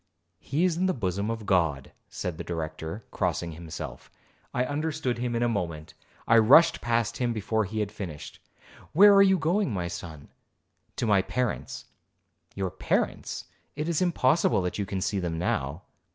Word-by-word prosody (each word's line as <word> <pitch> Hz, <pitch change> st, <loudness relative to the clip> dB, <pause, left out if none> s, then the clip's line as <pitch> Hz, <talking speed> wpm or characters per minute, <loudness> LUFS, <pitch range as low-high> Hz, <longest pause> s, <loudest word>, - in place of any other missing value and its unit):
'He 145 Hz, -, -1 dB
is 175 Hz, -3 st, +1 dB
in 185 Hz, +2 st, +2 dB
the 185 Hz, -, 0 dB
bosom 100 Hz, -2 st, -2 dB
of 115 Hz, -2 st, -4 dB
God,' 80 Hz, -8 st, +1 dB, 0.2 s
said 90 Hz, -3 st, -5 dB
the -, -, -3 dB
Director, 80 Hz, +3 st, -5 dB
crossing 85 Hz, -1 st, -1 dB
himself. 80 Hz, 0 st, -8 dB, 0.4 s
I 125 Hz, -, 0 dB
understood 145 Hz, -3 st, -2 dB
him 120 Hz, -1 st, -2 dB
in 120 Hz, -, +1 dB
a -, -, +3 dB
moment,—I 90 Hz, +3 st, -1 dB
rushed 150 Hz, +10 st, +6 dB
past 115 Hz, -1 st, 0 dB
him 120 Hz, -2 st, 0 dB
before 110 Hz, 0 st, 0 dB
he 110 Hz, +3 st, -3 dB
had 105 Hz, -1 st, -2 dB
finished. 90 Hz, -8 st, -8 dB, 0.5 s
'Where 200 Hz, +5 st, +8 dB
are 200 Hz, -, +7 dB
you 190 Hz, -1 st, +5 dB
going, 175 Hz, -, +1 dB
my 90 Hz, -4 st, -2 dB
son?' 80 Hz, -4 st, -8 dB, 0.7 s
'To -, -, -1 dB
my 105 Hz, -3 st, +4 dB
parents.' 125 Hz, +3 st, -3 dB, 0.7 s
'Your 95 Hz, -2 st, -2 dB
parents,—it 150 Hz, +2 st, -3 dB
is 170 Hz, -1 st, 0 dB
impossible 160 Hz, -, +2 dB
that 90 Hz, +3 st, -3 dB
you 100 Hz, -, -2 dB
can 95 Hz, 0 st, -3 dB
see 100 Hz, +1 st, 0 dB
them 85 Hz, -3 st, -2 dB
now.' 80 Hz, 0 st, -2 dB
110 Hz, 165 wpm, -27 LUFS, 90-135 Hz, 0.7 s, Where